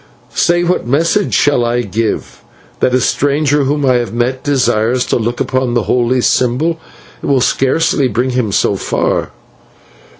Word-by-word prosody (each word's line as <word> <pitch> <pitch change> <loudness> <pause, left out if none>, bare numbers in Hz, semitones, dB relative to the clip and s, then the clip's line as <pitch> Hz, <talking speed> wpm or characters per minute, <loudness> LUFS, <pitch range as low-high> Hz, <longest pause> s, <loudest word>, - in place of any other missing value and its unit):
Say, 175 0 +2
what 175 -7 -1
message 165 - +1
shall 145 -4 +2
I 120 +1 0
give? 105 - -3 0.4
That 125 - +2
a - - +3
stranger 145 +2 +1
whom 145 +1 0
I 130 -2 +3
have 120 -1 -3
met 125 +2 -1
desires 125 -3 +1
to - - -1
look 120 +1 -2
upon 130 -2 -1
the 120 - +1
holy 125 +1 +1
symbol? 130 +9 +1 0.4
It - - -5
will 140 -2 +3
scarcely 135 +3 +1
bring 125 +3 -1
him 125 -4 -1
so - - +1
far.' - - -1
130 Hz, 160 wpm, -14 LUFS, 120-145 Hz, 0.4 s, a